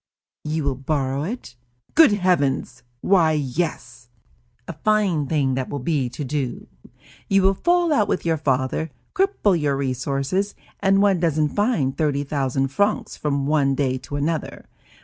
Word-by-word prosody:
"You 155 +1 -2
will 140 -1 0
borrow 135 -1 -1
it?" 175 - -6 0.4
"Good 320 -5 +7
heavens! 145 -10 0 0.2
Why, 170 -5 +3
yes!" 135 -4 -3 0.6
"A - - -5
fine 185 -3 +1
thing 140 -4 +1
that 130 0 -2
will 145 - -3
be 135 -2 -1
to 135 +5 -6
do; 135 -2 -3 0.6
you 195 -1 +3
will 195 +1 +4
fall 345 - +2
out 210 -7 +2
with - - -1
your 165 -1 +1
father, 135 +2 -1 0.2
cripple 380 - +1
your 140 -2 +1
resources, 140 +8 -1 0.2
and 195 0 +3
one 195 -3 +3
doesn't 155 -3 +1
find 205 - 0
thirty 145 -2 0
thousand 135 -2 -1
francs 205 +9 0
from 140 -2 -1
one 140 -2 +2
day 130 -2 0
to 140 +3 -8
another. 155 +3 -3
150 Hz, 150 wpm, -22 LUFS, 135-190 Hz, 0.6 s, Good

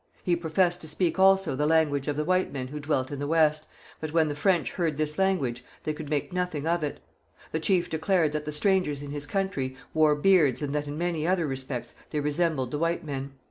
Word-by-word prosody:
He 175 - +2
professed 175 +2 +1
to 155 - -7
speak 170 +4 0
also 190 -5 +4
the 150 +2 +1
language 150 -3 +2
of 145 - 0
the 150 - 0
white 185 +2 +1
men 130 -2 -5
who 150 +2 -6
dwelt 145 -3 -1
in 140 - -4
the 145 - -2
West, 155 -1 +2 0.3
but 155 -1 -4
when 160 -1 +3
the 145 - -3
French 175 +3 +1
heard 165 -5 -1
this 150 +1 -1
language 140 -11 +1 0.2
they 155 - -1
could 150 -1 -7
make 150 +3 -2
nothing 180 -5 -2
of 170 0 +1
it. 145 - -3 0.5
The 160 - -1
chief 175 +1 +2
declared 160 -1 +1
that 150 0 -3
the 150 - -3
strangers 150 -3 +1
in 140 - -7
his 145 0 -4
country 145 -8 -2 0.2
wore 155 -1 +4
beards 150 -5 +3
and 140 -1 -2
that 150 0 -1
in 145 +1 -5
many 170 -2 -1
other 180 -2 +2
respects 130 -3 -4 0.2
they 150 - -2
resembled 150 -3 0
the 145 - -2
white 170 +1 0
men. 140 -2 -5
155 Hz, 225 wpm, -27 LUFS, 145-175 Hz, 0.5 s, also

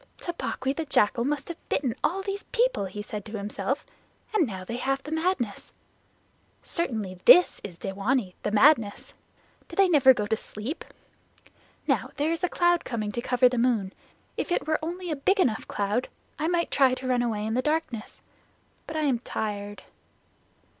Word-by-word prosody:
"Tabaqui 275 -6 -3
the 325 - -2
Jackal 235 -4 +3
must 290 0 -1
have 340 - -9
bitten 260 -5 0
all 385 +3 +1
these 400 0 -3
people," 485 - +1
he 205 +2 -6
said 210 -1 -6
to 215 0 -6
himself, 205 +1 -3 0.5
"and 355 -9 +3
now 190 -4 -6
they 230 +6 -5
have 270 +2 -1
madness. 320 - -1 0.9
Certainly 215 - -3
this 360 - +7
is 180 -4 -8
dewanee, 195 +2 -1
the - - -1
madness. 220 -1 +3 0.5
Do - - -10
they 390 -1 +5
never 285 -6 +7
go 210 -5 +1
to 220 +2 +1
sleep? 220 +8 -6 1.0
Now - - +1
there 295 +3 0
is 330 +1 -2
a 360 - +2
cloud 345 0 +2
coming 215 -3 -3
to 235 - -3
cover 250 0 +4
that 250 0 -1
moon. 230 -6 +1 0.4
If - - -3
it - - +1
were 310 0 +1
only 350 +1 -4
a - - 0
big 390 +9 +1
enough 225 -11 +1
cloud 205 +5 -1 0.3
I 310 - 0
might 345 0 0
try 265 -2 +4
to 255 - -6
run 250 -1 +2
away 220 -3 -1
in 220 - -2
the 250 - +2
darkness. 300 -7 -3 0.6
But 315 - -4
I - - +1
am 270 -6 +1
tired." 205 -3 -4
255 Hz, 175 wpm, -27 LUFS, 210-320 Hz, 1.0 s, this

